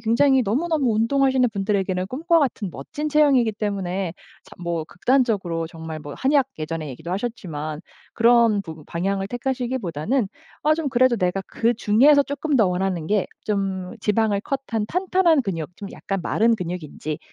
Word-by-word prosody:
굉장히 260 +4 +3
너무너무 270 +3 +1
운동하시는 260 +2 +3
분들에게는 195 -2 0
꿈과 330 - +2
같은 255 -9 0
멋진 290 - -5
체형이기 280 -7 +4
때문에 195 -4 -2 0.3
자 190 - -19
뭐 170 -2 -2
극단적 245 - +2
적으로 165 -2 -3
정말 160 -1 -7
뭐 145 -1 -8
한약 275 0 +3
예전에 155 0 -4
얘기도 160 +7 -8
하셨지만 165 -8 -4 0.3
그런 230 -3 +4
부분 160 -3 -10
방향을 195 +3 -2
택하시기보다는 245 - -2 0.4
아 305 +1 +5
좀 320 -3 -2
그래도 255 -1 +3
내가 185 -1 0
그중에서 235 +5 +4
쪼끔 285 +1 -1
더 220 -5 +4
원하는 180 -2 -1
게 205 +1 +1 0.2
좀 195 -3 -2
지방을 210 -1 +1
cut한 240 -6 -2
탄탄한 360 -3 +2
근육 175 -4 -4
좀 200 - -7
약간 195 -1 -4
마른 230 +6 +2
근육인지 165 -4 -5
210 Hz, 370 characters per minute, -23 LUFS, 180-260 Hz, 0.4 s, 아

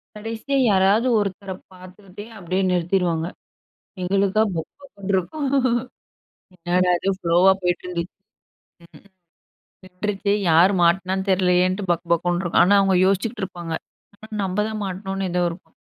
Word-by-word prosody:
கடைசியா 225 +6 -3
யாராவது 200 +5 +3
ஒருத்தர 200 -1 -4 0.2
பாத்துக்கிட்டே 185 +2 -12
அப்படியே 185 +1 -2
நிறுத்திடுவாங்க. 175 -2 0 0.8
எங்களுக்கா 195 +3 +2
பக்கு 160 -1 -5
பக்குன்னு 200 -8 -5
இருக்கும். 275 - -2 1.1
என்னடா 180 +1 +1
இது? 195 - -1
ஃப்லோவா 175 +1 +4
போயிட்டிருந்துச்சு. 180 0 -3 1.7
விட்டுருச்சே 200 +2 -2 0.2
யார் 170 +5 +5
மாட்டினான்னு 190 +3 +1
தெரியலையேன்னுட்டு 185 +1 +2
பக்கு 170 +1 -4
பக்குன்னு 175 +2 -1
இருக்கும். 175 - +3
ஆனா 200 +3 +4
அவங்க 190 -1 +2
யோசிச்சிட்டு 210 +3 -1
இருப்பாங்க. 175 -3 -6 0.4
ஆனா 220 +1 -14
நம்ம 190 +1 -3
தான் 215 -1 -4
மாட்டணும்னு 195 0 -4
ஏதோ 180 0 +1
இருக்கும். 170 - -12
190 Hz, 115 wpm, -22 LUFS, 180-200 Hz, 1.7 s, யார்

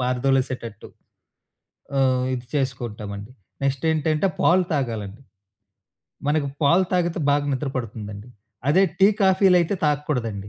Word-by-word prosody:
పారదోలేసేటట్టు. 125 -3 -1 1.1
ఆహ్, 130 -1 +2
ఇది 125 -1 -4
చేసుకుంటామండి. 110 -5 -4 0.3
నెక్స్టేంటంటే 155 +5 +1
పాలు 185 +2 +4
తాగాలండి. 115 -4 -3 1.1
మనకు 150 -1 +1 0.2
పాలు 170 +6 +4
తాగితే 175 -2 +1
బాగా 145 0 +2
నిద్ర 135 +1 -2
పడుతుందండి. 105 -2 -6 0.4
అదే 185 +6 +5 0.2
టీ, 195 - +7 0.2
కాఫీలైతే 190 -1 +4
తాగకూడదండి. 125 -9 -1
135 Hz, 95 wpm, -23 LUFS, 115-155 Hz, 1.1 s, టీ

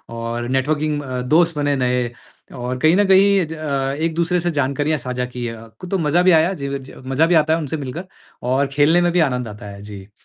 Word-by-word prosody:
और 115 +1 -4
नेटवर्किंग 145 +3 0
अ, 130 -2 -4
दोस्त 160 +5 +2
बने 145 -1 +1
नए 125 -2 0 0.4
और 125 +1 -4
कहीं 160 +5 +4
न 205 0 +3
कहीं 195 -1 +5
ज 160 - -7
अ, 140 -4 -2
एक-दूसरे 170 +2 0
से 175 0 -1
जानकारियाँ 145 +2 0
साझा 125 -1 -3
की 125 -1 -5
अ, 115 0 -8
क 180 - -7
तो 195 - +1
मज़ा 165 +1 +2
भी 185 - +5
आया, 165 +4 +4
जीवि 140 -4 -4
ज 135 0 -13
मज़ा 135 +4 +2
भी 175 - +3
आता 155 0 +3
है 165 - +1
उनसे 155 0 -3
मिलकर 145 +6 -6 0.4
और 130 +3 +1
खेलने 155 +5 +4
में 175 0 +2
भी 180 - +1
आनंद 125 -6 0
आता 105 -1 -10
है। 100 0 -10
जी। 100 -1 -10
145 Hz, 230 wpm, -20 LUFS, 125-165 Hz, 0.4 s, कहीं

